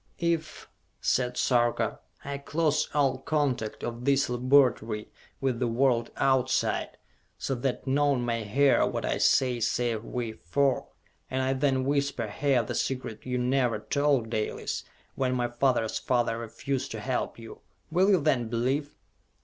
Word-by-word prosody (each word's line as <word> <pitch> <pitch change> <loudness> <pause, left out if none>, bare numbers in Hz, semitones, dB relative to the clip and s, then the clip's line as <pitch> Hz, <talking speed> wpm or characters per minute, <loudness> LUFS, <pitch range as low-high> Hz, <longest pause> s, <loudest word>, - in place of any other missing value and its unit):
"If," 165 -2 -2 0.3
said 125 -1 0
Sarka, 120 -2 +1 0.3
"I 140 0 -4
close 150 +1 0
all 140 -3 +1
contact 135 -7 -1
of 120 0 -4
this 140 -1 +2
laboratory 120 -4 +2 0.3
with 130 -3 -1
the 125 - +1
world 120 0 +2
outside, 130 -1 +1 0.4
so 135 - -2
that 125 0 -2
none 140 -2 +2
may 115 -1 -1
hear 135 +7 +3
what - - -3
I - - -1
say 125 -2 +3
save 115 0 0
we 120 -1 -3
four, 130 +7 0 0.4
and 130 0 -1
I 130 +1 +1
then 130 -1 +1
whisper 140 -3 0
here 130 +2 +1
the - - -5
secret 130 -4 -3
you 125 0 -1
never 125 -2 +1
told, 140 -1 0
Dalis, 110 -2 -3 0.3
when 130 -1 0
my 120 -1 0
father's 120 -2 +1
father 120 -2 0
refused 130 +4 -3
to 110 - -5
help 125 +3 -2
you 115 -1 -10 0.3
will 185 +4 +3
you 190 -5 +4
then 130 -6 +1
believe?" 130 +5 -1
130 Hz, 150 wpm, -28 LUFS, 120-140 Hz, 0.4 s, you